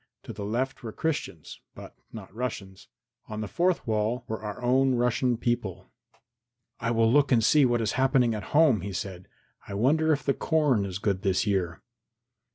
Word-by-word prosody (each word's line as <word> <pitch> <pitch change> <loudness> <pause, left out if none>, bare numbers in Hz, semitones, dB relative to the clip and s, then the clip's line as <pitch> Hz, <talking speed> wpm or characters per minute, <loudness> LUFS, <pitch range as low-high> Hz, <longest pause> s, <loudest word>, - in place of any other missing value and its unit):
To - - -8
the 100 - -7
left 120 +6 -2
were 115 -3 -6
Christians, 105 - -4 0.2
but - - -11 0.2
not 100 -4 -10
Russians. 105 -5 -6 0.4
On 110 0 -5
the 105 - -4
fourth 175 - 0
side 110 +1 0
were 110 -2 -4
our 105 -2 -6
own 130 +1 +3
Russian 120 0 +1
people. 95 -6 -3 0.9
"I 115 - -2
will 115 -1 +3
look 145 0 +3
and 115 -3 +4
see 140 +4 +5
what 120 -2 +1
is 110 - 0
happening 130 -2 +2
at 105 -3 -5
home," 145 - +5
he 100 +1 -5
said. 90 -1 -6 0.4
"I 100 - -6
wonder 155 +9 +2
if 145 - 0
the 140 - +1
corn 145 - +1
is 95 -2 -4
good 100 -2 -1
this 95 -3 +1
year?" 95 -4 -1
115 Hz, 180 wpm, -27 LUFS, 100-130 Hz, 0.9 s, see